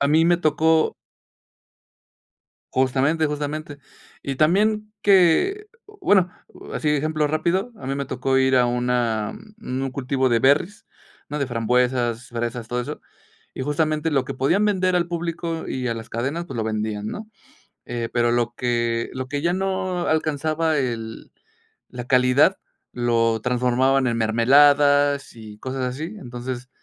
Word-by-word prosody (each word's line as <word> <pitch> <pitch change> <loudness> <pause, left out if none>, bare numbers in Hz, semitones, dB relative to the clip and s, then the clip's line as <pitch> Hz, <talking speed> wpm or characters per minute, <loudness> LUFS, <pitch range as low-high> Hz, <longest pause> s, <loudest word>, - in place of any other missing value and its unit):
a 140 - +2
mí 160 +2 +4
me 175 0 +4
tocó 160 0 +2 1.8
Justamente, 135 +5 +2
justamente. 150 0 -4 0.4
Y 135 -1 -4
también 210 +7 +2
que 205 - +4 0.4
bueno, 190 - +4 0.4
así 150 - 0
de 150 - +2
ejemplo 155 0 0
rápido, 170 +9 -1
a 130 - -10
mí 135 - -1
me 140 0 -3
tocó 130 0 -1
ir 130 0 +3
a 125 -1 +4
una, 120 -3 0 0.2
mm 135 - -4
un 135 - -3
cultivo 130 0 0
de 120 -2 +3
berries, 145 - +2 0.5
¿no?, 150 - -3
de 140 - -1
frambuesas, 120 0 0
fresas, 120 0 -4
todo 125 +1 -2
eso, - - -7 0.5
y, - - -4
justamente, 155 +2 0
lo 135 -3 +1
que 135 - -5
podían 170 +11 +2
vender 185 -3 +1
al 170 -1 0
público 170 -1 -4
y 125 -1 -3
a 115 - -1
las 115 0 -9
cadenas, 135 +9 -2
pues, 135 - -7
lo 110 - 0
vendían, 110 -1 -3
¿no?, 215 - -6 0.6
eh, 120 -1 -4
pero 120 -1 +2
lo 120 0 0
que 120 -1 -1
lo 130 0 -5
que 145 +1 -3
ya 170 +1 +1
no 185 -1 -2
alcanzaba 155 +1 0
el 115 -4 -4 0.6
la 125 -1 -7
calidad, 125 +8 +4 0.4
lo 115 -2 +1
transformaban 125 +2 +2
en 115 -1 0
mermeladas 145 +5 +4
y 110 -2 -11
cosas 130 0 -4
así. 155 +11 -5
Entonces, 125 -1 -7
135 Hz, 150 wpm, -22 LUFS, 120-160 Hz, 1.8 s, mí